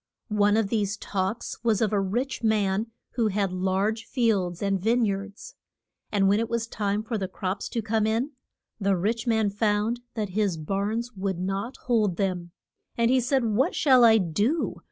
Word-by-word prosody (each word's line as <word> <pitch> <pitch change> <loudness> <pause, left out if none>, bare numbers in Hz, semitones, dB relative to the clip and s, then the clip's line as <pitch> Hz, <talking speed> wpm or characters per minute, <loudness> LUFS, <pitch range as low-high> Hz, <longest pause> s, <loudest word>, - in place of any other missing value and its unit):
One 205 0 +3
of 220 -3 +1
these 205 -2 0
talks 195 +4 -3
was 225 -3 +2
of 215 -2 +1
a 205 - +3
rich 245 +8 -2
man 210 -1 +1 0.2
who 235 -3 +1
had 200 -2 0
large 190 +4 0
fields 200 -9 0
and 195 -2 0
vine 230 +2 +3
yards. 200 - -4 0.6
And 195 -2 +3
when 200 +2 +3
it 230 0 -1
was 235 -1 -1
time 210 -2 -2
for 220 -1 -3
the 190 - -2
crops 185 +2 -4
to 230 - -2
come 220 0 +1
in, 230 +6 0 0.5
the 195 -2 +2
rich 225 +7 -1
man 220 -3 +2
found 210 +2 0 0.2
that 215 -3 -2
his 195 -2 0
barns 200 +9 -2
would 190 -1 -2
not 195 +7 -3
hold 215 -7 +2
them. 180 -3 -1 0.5
And 235 +1 +3
he 260 - +4
said, 255 +1 +1
What 225 +4 +1
shall 260 -5 +5
I 225 -1 +7
do? 205 - 0
210 Hz, 180 wpm, -26 LUFS, 195-230 Hz, 0.6 s, I